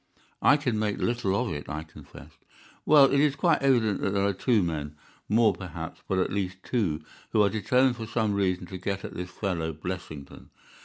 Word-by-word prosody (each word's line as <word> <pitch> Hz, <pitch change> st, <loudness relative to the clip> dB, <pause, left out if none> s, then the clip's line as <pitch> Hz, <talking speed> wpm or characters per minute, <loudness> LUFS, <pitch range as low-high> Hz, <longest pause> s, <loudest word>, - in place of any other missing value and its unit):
"I 145 Hz, -, +6 dB
can 125 Hz, -7 st, -1 dB
make 105 Hz, -1 st, -1 dB
little 115 Hz, -5 st, 0 dB
of 120 Hz, +3 st, -1 dB
it," 75 Hz, -, -7 dB
I 75 Hz, +1 st, -4 dB
confessed. 75 Hz, -2 st, -15 dB, 0.5 s
"Well, 145 Hz, -2 st, +8 dB
it 140 Hz, -, +3 dB
is 145 Hz, -1 st, +3 dB
quite 165 Hz, +2 st, +2 dB
evident 120 Hz, -7 st, +2 dB
that -, -, 0 dB
there 100 Hz, 0 st, +2 dB
are 100 Hz, -, +1 dB
two 110 Hz, +1 st, +2 dB
men—more, 85 Hz, +8 st, -1 dB
perhaps, 90 Hz, -3 st, -8 dB
but 95 Hz, -, 0 dB
at 95 Hz, -, 0 dB
least 95 Hz, -1 st, -3 dB
two—who 105 Hz, -1 st, -2 dB
are 100 Hz, -, +3 dB
determined 125 Hz, +4 st, +2 dB
for 115 Hz, -1 st, -6 dB
some 110 Hz, -2 st, 0 dB
reason 95 Hz, -2 st, 0 dB
to 95 Hz, +1 st, -8 dB
get 100 Hz, +1 st, -3 dB
at -, -, -7 dB
this 90 Hz, +1 st, -5 dB
fellow 85 Hz, -5 st, -3 dB
Blessington. 80 Hz, -3 st, -7 dB
100 Hz, 190 wpm, -27 LUFS, 90-115 Hz, 0.5 s, Well